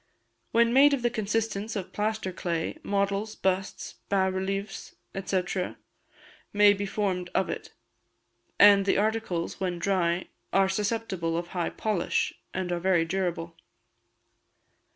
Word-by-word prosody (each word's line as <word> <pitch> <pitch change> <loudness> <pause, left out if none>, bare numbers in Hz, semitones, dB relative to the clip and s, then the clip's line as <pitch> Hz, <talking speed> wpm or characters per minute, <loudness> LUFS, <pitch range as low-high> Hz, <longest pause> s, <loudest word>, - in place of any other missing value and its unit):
When 235 0 +4
made 280 +2 +7
of 250 - -7
the 240 - +2
consistence 220 0 -2
of 195 -3 -5
plaster 210 -2 -1
clay, 170 - -3
models, 200 -1 -1
busts, 190 0 -2
bas 190 -1 +2
relievos, 195 +2 -4 0.3
&c., 185 -1 -1 0.8
may 205 0 +6
be 200 0 -3
formed 190 -3 -1
of 190 - +1
it; - - -6 0.9
and 200 -1 +7
the - - +3
articles, 210 -5 -1
when 180 -2 -1
dry, 175 -1 +1 0.3
are 195 0 +3
susceptible 190 -5 -1
of 170 0 -4
high 175 -2 -1
polish, 210 -6 -1 0.2
and 185 -1 -3
are 175 - 0
very 175 -2 +2
durable. 170 -2 -2
195 Hz, 130 wpm, -27 LUFS, 180-210 Hz, 0.9 s, made